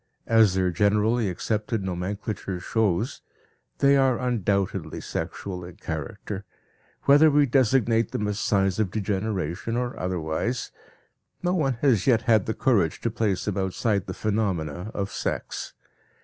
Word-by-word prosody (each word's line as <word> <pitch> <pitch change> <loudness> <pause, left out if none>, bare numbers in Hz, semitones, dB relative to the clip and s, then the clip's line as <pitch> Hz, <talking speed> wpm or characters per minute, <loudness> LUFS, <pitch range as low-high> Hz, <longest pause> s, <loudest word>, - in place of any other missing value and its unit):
As 110 -4 +4
their 95 -1 +2
generally 105 +4 +2
accepted 105 +3 -2
nomenclature 95 +1 -4
shows, 110 +3 0 0.6
they 140 0 +5
are 135 -3 +3
undoubtedly 105 -6 -1
sexual 90 -2 -5
in 90 0 -10
character; 95 +6 -5 0.6
whether 145 +3 +7
we 145 0 +4
designate 120 -3 +2
them 105 - -2
as 105 0 -2
signs 95 -2 +1
of 105 -4 +1
degeneration, 100 0 -2
or 125 0 -2
otherwise, 90 +7 -2 0.7
no 180 0 +1
one 145 -7 +1
has 125 -8 +3
yet 115 -4 +4
had 110 -5 +3
the 110 - -1
courage 100 -11 +2
to 115 - -1
place 105 -4 -1
them 105 -2 -2
outside 100 +1 0
the - - -5
phenomena 95 -5 -1
of 100 -1 -2
sex. - - -4
105 Hz, 135 wpm, -25 LUFS, 95-115 Hz, 0.7 s, whether